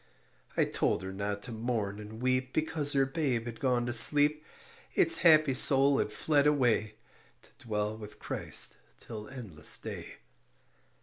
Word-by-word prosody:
I - - +2
told 95 - -2
her 95 0 -7
not 100 +1 -5
to 125 - -8
mourn 110 -3 -4
and 110 +3 -11
weep 130 0 -1
Because 155 -2 -1
her 135 -1 +1
babe 135 -5 -3
had 115 -1 -9
gone 125 -2 -1
to 120 - -4
sleep; 150 +5 +4 0.5
Its 335 - +6
happy 155 -4 +4
soul 135 +1 +5
had - - -2
fled 145 +4 0
away 120 -7 0 0.5
To - - -21 0.2
dwell 105 0 -3
with 105 -1 -12
Christ - - -2 0.2
till 105 -2 -10
endless 110 - -1
day. - - -9
125 Hz, 150 wpm, -29 LUFS, 105-140 Hz, 0.5 s, Its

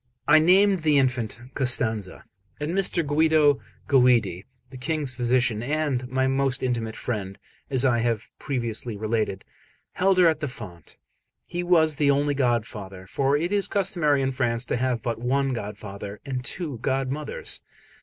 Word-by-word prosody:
I 155 - +7
named 190 +4 +4
the 155 -2 +3
infant 125 -5 0
Costanza; 110 -7 0 0.3
and 150 +2 -2
Mr. 180 -3 +1
Guido 150 -1 +3 0.3
Guidi, 120 -9 +3 0.2
the 130 - -9
King's 145 0 -2
physician, 120 -2 +1
and 140 -2 -1
my 130 0 +1
most 135 0 0
intimate 115 -3 -2
friend, 100 -5 -4 0.3
as 135 -1 +3
I 120 -3 +3
have 115 -1 -1
previously 120 -4 -3
related, 110 -2 -2 0.5
held 190 +1 +2
her 180 - +6
at 160 -2 +2
the 150 - -2
font. 105 -9 -10 0.5
He 175 - -4
was 160 -4 +3
the 145 -1 +2
only 145 +1 +2
godfather; 110 -8 -2
for 135 +8 +1
it 170 +5 -2
is 205 -1 +2
customary 170 -8 +1
in 135 - 0
France 120 -2 0
to - - -1
have 125 -2 -1
but 115 -1 -2
one 135 +2 +1
godfather 100 -2 -7
and 130 -2 -3
two 145 -1 -4
godmothers. 135 +3 -2
130 Hz, 155 wpm, -25 LUFS, 115-150 Hz, 0.5 s, I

